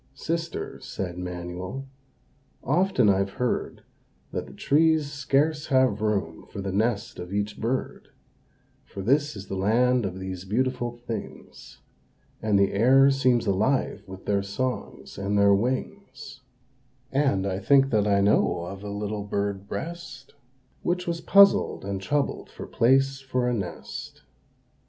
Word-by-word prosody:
"Sister," 165 +3 -4
said 90 -2 -5
Manuel, 90 +8 -6 0.8
"often 165 - +2
I've 100 0 +2
heard, 125 -1 -2 0.5
That - - -4
the - - -12
trees 155 0 +2
scarce 145 +2 0
have 130 -6 +2
room 100 -7 -2
for - - -8
the 100 0 -3
nest 110 +3 -1
of 90 +1 -7
each 105 +1 -2
bird; 125 +4 -2 0.8
For 100 - -8
this 145 +6 +2
is 100 -1 -8
the 95 - -5
land 120 +4 +2
of 95 0 -6
these 95 -1 -5
beautiful 120 +4 -1
things, 115 -3 -8 0.6
And 105 -2 +2
the 100 0 +2
air 135 +6 +5
seems 130 -3 +2
alive 110 +8 +1
with 95 0 -10
their 100 -1 +1
songs 110 +2 -4
and 100 +1 0
their 100 0 +5
wings; 130 - -3 0.7
And 135 -9 +1
I 95 -1 -2
think 135 +6 +4
that 105 -2 +2
I 100 -1 +3
know 100 -3 +2
of 95 +3 -7
a 105 - -5
little 105 0 -3
bird 100 -1 -3
breast, 135 -3 -7 0.5
Which 180 +1 -1
was 170 -1 -3
puzzled 200 - +5
and 100 -1 -3
troubled 145 +8 -1
for - - -9
place 135 +3 +2
for 130 -2 -1
a 125 - +1
nest." 95 -7 -6
110 Hz, 140 wpm, -26 LUFS, 100-135 Hz, 0.8 s, air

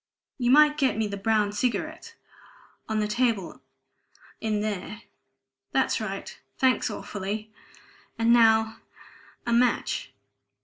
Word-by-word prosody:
You 245 -1 +1
might 300 +2 +6
get 265 -5 +2
me 220 - +1
the 200 -1 -4
brown 210 0 +1
cigarettes... 255 - -3 0.8
on 220 0 0
the 210 - 0
table 225 -5 -1 0.8
in 215 -2 -1
there. 210 +1 -4 0.7
That's - - +1
right... - - -6 0.2
thanks 260 -2 +2
awfully... 210 +1 -5 0.7
and 230 +1 +4
now 220 -1 +4 0.7
a 235 - 0
match!" 240 +1 +1
220 Hz, 115 wpm, -26 LUFS, 210-245 Hz, 0.8 s, might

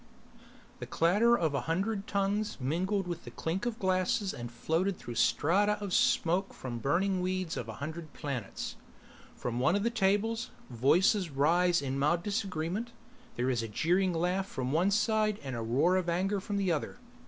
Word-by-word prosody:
The - - -6
clatter 210 +8 +3
of 160 -3 0
a 140 - 0
hundred 195 +4 -1
tongues 200 +2 -1
mingled 185 +9 0
with 175 -1 -5
the 120 - -8
clink 165 - -3
of 235 -2 -3
glasses 190 +1 0
and 120 0 -7
floated 165 +10 -1
through 120 - -7
strata 185 - +3
of 200 -3 -4
smoke 180 +4 +2
from 120 -2 -5
the - - -6
burning 185 - +1
weeds 185 -2 -2
of 115 - -5
a - - -5
hundred 155 +3 -6
planets. 130 -9 -5 0.6
From 120 0 -3
one 135 +8 +3
of 200 - 0
the 235 - +1
tables, 225 +2 +1 0.2
voices 165 - +3
rise 170 +4 +2
in 135 0 -2
mild 165 +5 +2
disagreement. 200 +2 -2 0.4
There 125 +2 0
is 120 -2 0
a 115 - -4
jeering 180 - +1
laugh 180 +3 0
from 130 -8 -3
one 170 +6 +3
side 215 0 +1
and 130 -2 -4
a 115 - -3
roar 135 +11 +2
of 180 -2 -1
anger 190 +4 0
from 200 +1 -3
the 195 -3 +1
other. 160 +8 -2
180 Hz, 180 wpm, -31 LUFS, 145-200 Hz, 0.6 s, clatter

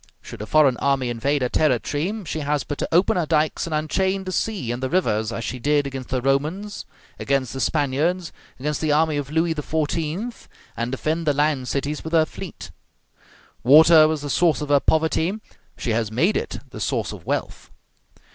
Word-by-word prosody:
Should - - -9
a 105 - -6
foreign 140 -4 +4
army 135 -3 0
invade 135 +4 0
her 125 - 0
territory, 155 - 0
she 155 - -3
has 145 -1 -1
but 145 - -5
to - - -2
open 180 +3 +3
her 170 -3 0
dikes 155 +1 +1
and 165 - -4
unchain 190 +5 0
the 185 - -5
sea 185 - -2
and 120 +1 -4
the 130 - -1
rivers, 110 -10 0
as 115 - -4
she 130 - -4
did 145 +3 +2
against 135 -2 -6
the 130 -2 -1
Romans, 155 +10 -1 0.3
against 135 -3 0
the 135 - -5
Spaniards, 155 +6 0 0.3
against 150 +2 -2
the 155 -1 +1
army 155 0 +2
of 140 -1 -3
Louis 160 +2 +1
XIV., 160 +8 -3 0.3
and 120 +1 -3
defend 155 +5 -2
the 145 - +4
land 145 -3 +1
cities 140 +3 -2
with 160 - -6
her 160 -1 +5
fleet. - - -9 0.9
Water 155 +4 +8
was 155 -2 -2
the 145 - -4
source 170 -3 +3
of 150 -1 -5
her 145 -1 +5
poverty, 160 +6 +1 0.4
she 120 - -2
has 110 -1 0
made 165 - +2
it - - -3
the - - -8
source - - -1
of - - -11
wealth. - - -3
150 Hz, 195 wpm, -23 LUFS, 135-160 Hz, 0.9 s, Water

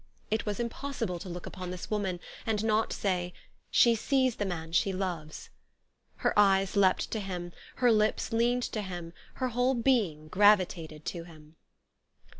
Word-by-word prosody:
It 220 0 0
was 205 +1 -2
impossible 235 -6 -3
to 185 - -8
look 175 0 -6
upon 185 -1 -6
t'lis 180 +2 -7
woman, 195 -4 -1 0.2
and 220 -2 -1
not 220 0 +2
say, 180 -3 -1 0.2
" - - -39
She 235 - +5
sees 260 +1 +1
the 205 - -1
man 165 -3 -4
she 180 +4 +2
loves." 175 -5 -4 0.7
Her - - +4
eyes 195 -1 +4
leaped 190 -2 +3
to 220 - -1
him; 180 -3 -5 0.2
her 245 -2 +4
lips 215 +1 +1
leaned 240 +2 +2
to 215 - -1
him; 175 -4 -6 0.2
her 255 -1 -1
whole 245 +2 +1
being 220 - +1
gravitated 175 -5 +3
to 170 -2 -4
him. 155 -2 -16
195 Hz, 165 wpm, -30 LUFS, 175-225 Hz, 0.7 s, She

